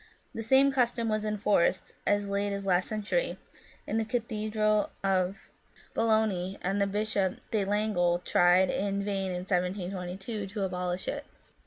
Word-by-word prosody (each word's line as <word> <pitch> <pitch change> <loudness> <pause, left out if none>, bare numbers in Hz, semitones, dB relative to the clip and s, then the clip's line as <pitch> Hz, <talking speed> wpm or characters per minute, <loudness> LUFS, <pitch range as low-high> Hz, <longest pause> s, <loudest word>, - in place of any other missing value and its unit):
The 225 - -4
same 265 +5 +5
custom 240 -3 +1
was 215 0 0
in 210 0 -1
force, 200 -3 +1
as 205 0 +2
late 200 0 -1
as 200 0 -4
last 185 -1 +2
century, 215 - -1 0.5
in 220 - -1
the 225 - +2
cathedral 215 -2 0
of 190 0 0 0.4
Boulogne, 215 -5 +1
and 195 +2 0
the 200 - +3
bishop, 200 -2 0
De 215 -3 +2
Langle, 200 -4 +1
tried 180 +1 +4
in 200 0 -1
vain 195 -2 -1
in 180 0 -3
1722 190 +2 -2
to 200 +1 -4
abolish 180 -1 -2
it. - - -3
200 Hz, 150 wpm, -29 LUFS, 185-215 Hz, 0.5 s, same